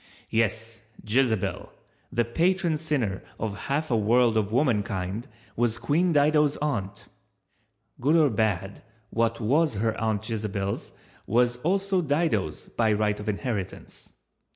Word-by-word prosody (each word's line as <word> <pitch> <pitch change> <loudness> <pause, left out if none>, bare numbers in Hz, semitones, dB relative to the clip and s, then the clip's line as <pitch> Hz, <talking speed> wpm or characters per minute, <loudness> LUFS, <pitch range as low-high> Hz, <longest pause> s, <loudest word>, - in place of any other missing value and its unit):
Yes, 115 +1 -1 0.3
Jezebel, 115 -2 0 0.4
the 120 0 +1
patron 170 +6 +1
sinner 140 -11 -1 0.2
of 110 -3 -2
half 145 +1 -1
a - - +3
world 115 +2 +3
of 105 -2 +1
womankind, 105 -5 0 0.3
was 120 -1 +1
Queen 155 +9 +1
Dido's 150 -1 +3
aunt. 115 -11 -3 0.9
Good 145 +6 +3
or 155 -5 +5
bad, 100 -3 -1 0.3
what 115 0 0
was 140 +5 +2
her 110 +2 0
Aunt 110 -1 -1
Jezebel's 105 -3 -3 0.4
was 120 +2 +2
also 190 +6 +1
Dido's 145 - 0
by 110 -2 +1
right 105 0 +1
of 105 +1 -4
inheritance. 105 -3 -5
115 Hz, 125 wpm, -26 LUFS, 105-145 Hz, 0.9 s, or